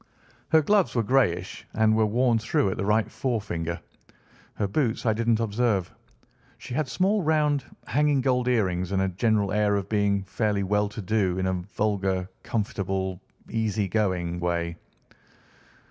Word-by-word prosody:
Her 160 -1 +5
gloves 200 0 +2
were 115 - +2
greyish 100 -7 0
and 110 0 +3
were 110 -1 +3
worn 120 +1 +2
through 135 - +1
at - - -4
the - - -2
right 105 +1 +2
forefinger. 90 -9 -2 0.8
Her 100 - -1
boots 120 +2 -1
I 110 - +3
didn't 115 0 +1
observe. 110 -4 0 0.6
She - - -8
had 150 +2 0
small 195 +9 +1
round, 150 -4 +2 0.2
hanging 145 -1 +2
gold 125 -2 +1
earrings, 95 -7 +1
and 95 - +2
a 95 - +1
general 100 +1 +1
air 105 0 +2
of 100 0 -3
being 100 -2 +1
fairly 100 0 -1
well 105 +1 +1
to 105 0 -7
do 95 -3 +1
in 95 - -1
a 95 - +1
vulgar, 95 0 -1
comfortable, 95 -5 -2 0.3
easy 110 -3 -1
going 90 -4 -1
way." 85 -1 -1
105 Hz, 155 wpm, -26 LUFS, 95-120 Hz, 0.8 s, Her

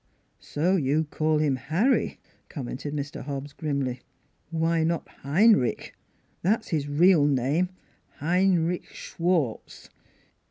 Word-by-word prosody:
" - - -44 0.2
So 175 +6 +2
you 150 0 +1
call 155 +1 0
him 150 -3 +1
Harry," 165 - 0 0.3
commented 140 0 -5
Mr. 145 -1 -5
Hobbs 140 0 -6
grimly. 140 -5 -2 0.5
"Why 165 0 +1
not 165 +1 -1
Heinrich? 165 - +2 0.5
That's 215 +5 0
his 150 -3 -1
real 155 0 +5
name 145 +6 +1 0.5
Heinrich 180 +1 +1
Schwartz! 165 -9 -3
155 Hz, 110 wpm, -26 LUFS, 140-175 Hz, 0.5 s, real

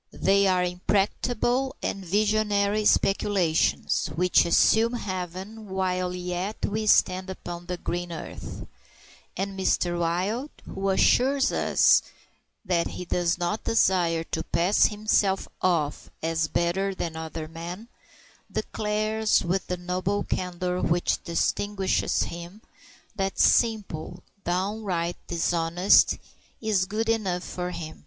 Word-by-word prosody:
They 200 +1 +3
are 185 -1 +3
impracticable 225 +8 0
and 195 - -2
visionary 210 +1 +1
speculations, 195 -5 +2
which 180 +1 +3
assume 220 +7 +4
heaven 190 0 -5
while 185 -1 -1
yet 180 +3 -3
we 215 +1 -2
stand 185 -2 +3
upon 175 -2 -7
the 180 -1 -3
green 175 0 -4
earth; 165 - -7 0.7
and 195 +1 -3
Mr. 175 -2 0
Wild, 190 - -1 0.2
who 195 0 -3
assures 265 +7 +3
us - - +4 0.6
that 175 -3 +1
he 180 - -6
does 175 -1 0
not 175 +5 -2
desire 175 -6 +2
to 160 - -3
pass 175 +5 +3
himself 210 -2 +1
off 160 -5 0
as 165 0 0
better 190 +4 0
than 165 -3 -4
other 160 0 -5
men, 170 +7 -8 0.6
declares, 215 +1 0
with 180 +2 -1
the 180 - -2
noble 185 +3 -1
candor 180 0 -2
which 175 +1 0
distinguishes 190 +3 0
him, 175 +5 -8 0.5
that 195 -1 -2
simple, 190 -7 +1 0.2
downright 180 -1 -1
dishonesty 170 +2 +3 0.4
is 210 -4 +1
good 215 +4 -2
enough 195 -6 0
for 180 0 -4
him. 165 -3 -7
185 Hz, 115 wpm, -26 LUFS, 175-205 Hz, 0.7 s, assume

